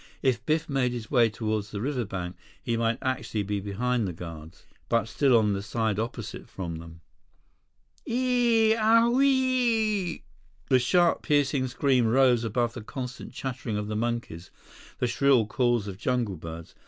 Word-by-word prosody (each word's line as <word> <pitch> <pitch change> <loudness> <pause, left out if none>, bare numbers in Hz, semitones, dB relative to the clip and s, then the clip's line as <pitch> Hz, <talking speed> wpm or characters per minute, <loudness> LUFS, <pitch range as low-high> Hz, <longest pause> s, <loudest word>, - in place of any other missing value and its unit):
If 130 -4 +1
Biff 160 +1 +1
made 135 -3 0
his 115 -2 -6
way 120 -4 +4
toward 110 -1 -2
the 105 0 -6
riverbank, 100 -8 -3 0.2
he 115 - -2
might 115 0 0
actually 130 -5 -2
be 100 0 -2
behind 110 +3 -1
the 90 - -4
guards, 80 -1 -10 0.2
but 115 -2 +2
still 130 +1 +3
on 105 -2 +2
the 100 - -2
side 110 0 -1
opposite 115 +2 -5
from 85 -4 -5
them. 85 0 -11 1.1
"Eeeeee 235 -3 +3
owieeeee!" 230 -4 +2 0.5
The 130 -2 +5
sharp, 175 +7 +3
piercing 140 -2 +1
scream 130 -2 +2
rose 125 0 +4
above 115 +1 0
the 120 - -7
constant 125 +3 -7
chattering 125 -5 -4
of 105 0 -4
the 105 - -2
monkeys, 115 -7 -3 0.5
the - - 0
shrill 130 -1 +3
calls 120 -1 0
of 95 -1 -7
jungle 120 -5 -1
birds. 80 +1 -9
120 Hz, 155 wpm, -27 LUFS, 105-140 Hz, 1.1 s, The